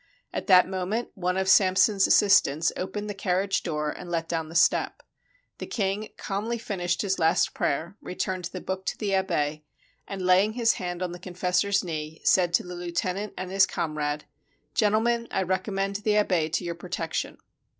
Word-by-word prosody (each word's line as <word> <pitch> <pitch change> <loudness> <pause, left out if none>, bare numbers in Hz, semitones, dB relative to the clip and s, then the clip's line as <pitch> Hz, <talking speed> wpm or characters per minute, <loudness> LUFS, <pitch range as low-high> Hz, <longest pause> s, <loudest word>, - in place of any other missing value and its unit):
At - - -4
that 185 -3 +7
moment 190 +5 -2
one 180 0 -1
of 190 0 0
Samson's 195 +1 +5
assistants 165 -6 +4
opened 205 +3 -4
the 205 - -3
car 190 -1 0
riage 195 -1 0
door 150 -3 -2
and 180 - -9
let 165 -1 -2
down 160 -2 -3
the 165 - -10
step. 170 - +2 0.6
The - - -6
king 205 0 -2
calmly 215 +4 -3
fin 210 -4 -5
ished 175 +3 0
his 195 -2 -1
last 160 0 +2
prayer, 165 +7 -2
returned 185 0 -3
the 180 +2 -6
book 190 0 -5
to - - -2
the 205 -3 -2
abbe, 155 -6 0 0.4
and, 195 -2 -5
laying 190 +4 +4
his 230 -1 +3
hand 175 0 -3
on 180 - -3
the 175 - -8
confessor's 185 +2 0
knee, 155 -2 -5
said 180 -2 +4
to - - +1
the 180 - -8
lieu 175 0 -6
tenant 185 +4 -2
and 185 0 -5
his 195 0 +4
comrade: 150 -3 -3 0.5
"Gentlemen, 230 +2 +2
I 190 - 0
recommend 195 +2 -1
the 210 0 +1
abbe 180 -6 +2
to 165 - -1
your 170 - -2
protection." 170 -1 -4
185 Hz, 185 wpm, -26 LUFS, 175-195 Hz, 0.6 s, that